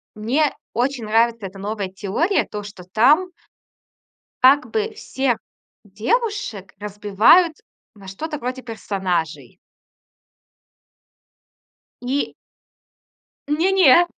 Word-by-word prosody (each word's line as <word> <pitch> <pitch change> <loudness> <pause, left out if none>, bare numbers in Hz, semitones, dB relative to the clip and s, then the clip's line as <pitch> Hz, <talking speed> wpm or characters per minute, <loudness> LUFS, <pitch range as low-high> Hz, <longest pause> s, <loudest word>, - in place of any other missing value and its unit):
мне 260 +8 +1 0.2
очень 245 -1 -1
нравится 225 0 +2
эта 195 +1 -13
новая 205 0 -3
теория, 205 - 0
то, 210 -1 -6
что 205 -3 -10
там 255 - +3 1.1
Как 275 +3 +5
бы 440 0 -1
всех 265 - -1 0.5
девушек 225 - -2
разбивают 210 - +3 0.4
на 195 -2 -14
что-то 300 +11 -5
вроде 255 0 -4
персонажей. 190 -8 -3 2.4
И 260 +3 -2 1.1
Не 320 +6 +1
не, 350 -3 +6
235 Hz, 90 wpm, -21 LUFS, 205-305 Hz, 2.4 s, не